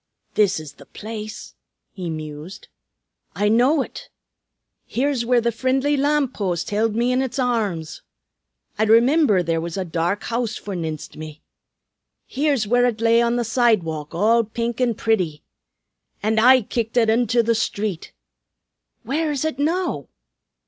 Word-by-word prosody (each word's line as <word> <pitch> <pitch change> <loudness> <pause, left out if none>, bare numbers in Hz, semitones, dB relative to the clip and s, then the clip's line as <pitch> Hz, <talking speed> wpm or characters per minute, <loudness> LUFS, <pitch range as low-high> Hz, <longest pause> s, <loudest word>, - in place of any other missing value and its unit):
"This 195 -4 +2
is 155 -2 -10
the 140 - -17
place," 215 0 -8 0.4
he 180 -3 -5
mused. 155 +4 -8 0.7
"I 205 0 +1
know 260 +6 +3
ut; - - -11 0.8
here's 260 -1 -1
where 250 -1 +4
the 235 0 0
frindly 265 +5 +1
lam'post 265 - 0
hild 215 +1 +1
me 240 +2 +1
in 255 +1 +2
its 260 -1 -3
arrums. 215 - -1 0.8
I 220 - +3
rimimber 235 - +4
there 165 0 0
was 170 +2 -5
a 190 - -2
dark 170 +4 -1
house 235 -1 -2
forninst 165 -6 -6
me. 155 0 -9 0.8
Here's 280 -4 0
where 245 +3 +3
ut 230 -3 -2
lay 230 +1 +4
on 235 0 +1
the 240 - 0
sidewalk, 190 - 0
all 225 +6 +3
pink 230 +2 -3
an' 240 -3 +2
pretty. 185 -10 -1 0.8
An' 220 +1 +2
I 255 +2 +6
kicked 230 +2 -3
ut 225 -2 +4
into 235 +1 +2
the 230 +1 +2
street! 210 -5 -3 0.9
Where 310 +3 -1
is 290 +1 -2
ut 315 -4 -3
now? 325 - -1
225 Hz, 145 wpm, -22 LUFS, 185-250 Hz, 0.9 s, I